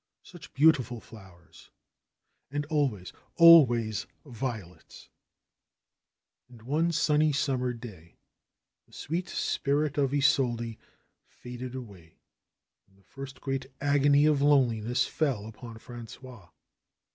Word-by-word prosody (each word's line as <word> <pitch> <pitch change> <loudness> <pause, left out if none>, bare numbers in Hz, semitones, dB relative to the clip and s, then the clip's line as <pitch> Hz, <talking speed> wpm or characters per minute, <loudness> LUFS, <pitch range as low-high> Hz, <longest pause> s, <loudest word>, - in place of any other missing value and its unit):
Such 175 -6 -14
beautiful 135 -5 +3
flowers! 95 -7 -17 0.8
And 145 +2 -3
always, 130 - -1 0.2
always 120 - +6 0.2
violets! 115 - -8 1.4
And 120 -3 -16
one 155 +7 0
sunny 155 -1 +2
summer 135 -3 -1
day 105 -9 -12 0.7
the - - -26
sweet 170 +5 -4
spirit 145 +1 -1
of 135 -2 +1
Isolde 125 -5 0 0.5
faded 125 +1 -9
away 100 -10 -11 0.7
and 95 0 -29
the 100 - -27
first 135 +5 -11
great 135 -1 -3
agony 145 0 +3
of 150 -2 +2
loneliness 125 -4 +2
fell 135 -10 -2
upon 115 +1 -10
Frangois. 120 -3 -12
130 Hz, 100 wpm, -28 LUFS, 115-145 Hz, 1.4 s, always